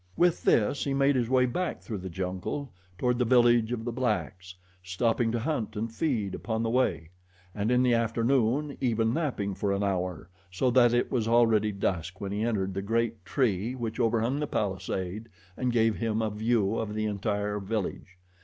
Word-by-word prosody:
With 175 Hz, -1 st, +3 dB
this 115 Hz, +6 st, +3 dB
he 140 Hz, -1 st, -1 dB
made 140 Hz, 0 st, +3 dB
his 120 Hz, -2 st, 0 dB
way 130 Hz, -1 st, +4 dB
back 175 Hz, +8 st, -2 dB
through 110 Hz, -4 st, -6 dB
the 95 Hz, +1 st, -6 dB
jungle 95 Hz, -, -4 dB, 0.3 s
toward 125 Hz, +2 st, 0 dB
the -, -, +3 dB
village 120 Hz, -1 st, +4 dB
of 115 Hz, -2 st, -3 dB
the 120 Hz, -, -2 dB
blacks, 105 Hz, -6 st, -2 dB, 0.3 s
stopping 115 Hz, +5 st, 0 dB
to 120 Hz, -, 0 dB
hunt 120 Hz, -3 st, -2 dB
and 110 Hz, +2 st, -3 dB
feed 115 Hz, -, -1 dB
upon 110 Hz, +1 st, -2 dB
the 115 Hz, -, 0 dB
way, 90 Hz, -11 st, 0 dB, 0.4 s
and, 105 Hz, +1 st, -1 dB
in 125 Hz, 0 st, +3 dB
the 125 Hz, -1 st, +3 dB
afternoon, 120 Hz, +4 st, +1 dB
even 115 Hz, -3 st, +1 dB
napping 130 Hz, -11 st, -1 dB
for 100 Hz, +1 st, -1 dB
an 100 Hz, +1 st, 0 dB
hour, 90 Hz, -4 st, -2 dB, 0.2 s
so 110 Hz, +8 st, 0 dB
that 120 Hz, -1 st, +5 dB
it 120 Hz, 0 st, +1 dB
was 115 Hz, -4 st, 0 dB
already 115 Hz, -2 st, +3 dB
dusk 95 Hz, -2 st, -2 dB
when 100 Hz, -1 st, -4 dB
he 105 Hz, +1 st, -2 dB
entered 100 Hz, -5 st, -1 dB
the 95 Hz, -, -2 dB
great 115 Hz, 0 st, -1 dB
tree 110 Hz, +1 st, 0 dB
which 115 Hz, -2 st, -4 dB
overhung 115 Hz, +3 st, +1 dB
the 150 Hz, -, -1 dB
palisade 95 Hz, +1 st, -3 dB, 0.3 s
and 125 Hz, -1 st, -1 dB
gave 115 Hz, -2 st, +2 dB
him 115 Hz, -1 st, -1 dB
a 110 Hz, -, -1 dB
view 110 Hz, 0 st, +1 dB
of 105 Hz, -1 st, -3 dB
the 110 Hz, 0 st, -1 dB
entire 105 Hz, 0 st, -1 dB
village. 95 Hz, -2 st, -4 dB
115 Hz, 190 wpm, -28 LUFS, 100-120 Hz, 0.4 s, that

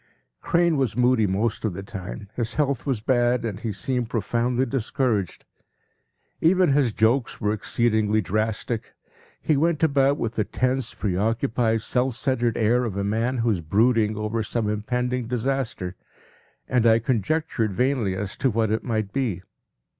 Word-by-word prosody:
p> -, -, -16 dB
Crane 170 Hz, -2 st, +3 dB
was 125 Hz, -5 st, -1 dB
moody 125 Hz, -3 st, +3 dB
most 105 Hz, +4 st, -1 dB
of 110 Hz, -5 st, -1 dB
the 95 Hz, +2 st, -6 dB
time, 100 Hz, -1 st, -7 dB
his 120 Hz, -1 st, -3 dB
health 140 Hz, -2 st, 0 dB
was 130 Hz, -6 st, 0 dB
bad 120 Hz, 0 st, +2 dB
and 105 Hz, -3 st, -4 dB
he 115 Hz, -1 st, -3 dB
seemed 120 Hz, +4 st, -2 dB
profoundly 120 Hz, +2 st, 0 dB
discouraged. 115 Hz, -, -1 dB, 0.9 s
Even 180 Hz, -1 st, +4 dB
his 135 Hz, -5 st, +3 dB
jokes 115 Hz, +5 st, +1 dB
were 105 Hz, 0 st, 0 dB
exceedingly 110 Hz, -1 st, +1 dB
drastic. 110 Hz, +3 st, -2 dB, 0.4 s
He 155 Hz, -, +1 dB
went 160 Hz, +2 st, +1 dB
about 140 Hz, -2 st, +3 dB
with 115 Hz, 0 st, -2 dB
the 110 Hz, -, 0 dB
tense, 130 Hz, +2 st, -1 dB
preoccupied, 110 Hz, +3 st, 0 dB
self 125 Hz, -1 st, 0 dB
centered 120 Hz, -3 st, 0 dB
air 120 Hz, +2 st, +2 dB
of 105 Hz, -5 st, -3 dB
a 100 Hz, -, -1 dB
man 115 Hz, +5 st, 0 dB
who 115 Hz, -1 st, +1 dB
is 95 Hz, -5 st, -1 dB
brooding 110 Hz, +5 st, +2 dB
over 105 Hz, +1 st, -2 dB
some 110 Hz, +1 st, -2 dB
impending 125 Hz, +3 st, -1 dB
disaster, 125 Hz, -6 st, -2 dB, 0.7 s
and 125 Hz, -2 st, +2 dB
I 110 Hz, 0 st, +6 dB
conjectured 120 Hz, -, 0 dB
vainly 125 Hz, -6 st, +1 dB
as 100 Hz, +1 st, -4 dB
to 135 Hz, -, +1 dB
what 110 Hz, -1 st, 0 dB
it 110 Hz, -, 0 dB
might 110 Hz, -4 st, -2 dB
be. 115 Hz, -10 st, -1 dB
115 Hz, 160 wpm, -24 LUFS, 105-130 Hz, 0.9 s, I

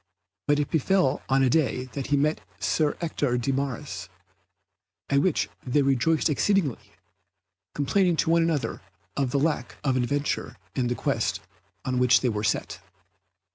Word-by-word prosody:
But 145 Hz, -, +4 dB
it 145 Hz, -, -2 dB
befell 165 Hz, -2 st, +2 dB
on 135 Hz, 0 st, +3 dB
a 130 Hz, -, +4 dB
day 140 Hz, -4 st, +1 dB
that 135 Hz, 0 st, -4 dB
he 145 Hz, -, +2 dB
met 150 Hz, -3 st, +1 dB, 0.2 s
Sir 145 Hz, +9 st, +1 dB
Ector 145 Hz, -6 st, 0 dB
de 125 Hz, +3 st, 0 dB
Maris, 135 Hz, -3 st, -4 dB, 1.0 s
at 140 Hz, 0 st, +4 dB
which 180 Hz, 0 st, +1 dB, 0.2 s
they 140 Hz, +3 st, +2 dB
rejoiced 140 Hz, +4 st, +2 dB
exceedingly, 160 Hz, -, 0 dB, 0.8 s
complaining 175 Hz, +5 st, +2 dB
to 160 Hz, -, +1 dB
one 170 Hz, 0 st, +4 dB
another 165 Hz, -4 st, -1 dB, 0.3 s
of 135 Hz, -2 st, 0 dB
the 140 Hz, -, 0 dB
lack 145 Hz, -4 st, -1 dB
of 135 Hz, -3 st, +1 dB
adventure 140 Hz, +3 st, -1 dB, 0.2 s
in 125 Hz, -2 st, 0 dB
the 120 Hz, -, -1 dB
quest -, -, -1 dB, 0.5 s
on 130 Hz, -1 st, 0 dB
which 125 Hz, 0 st, +5 dB
they 125 Hz, -, +1 dB
were 105 Hz, -2 st, -2 dB
set. 105 Hz, -, -1 dB
140 Hz, 155 wpm, -26 LUFS, 125-155 Hz, 1.0 s, which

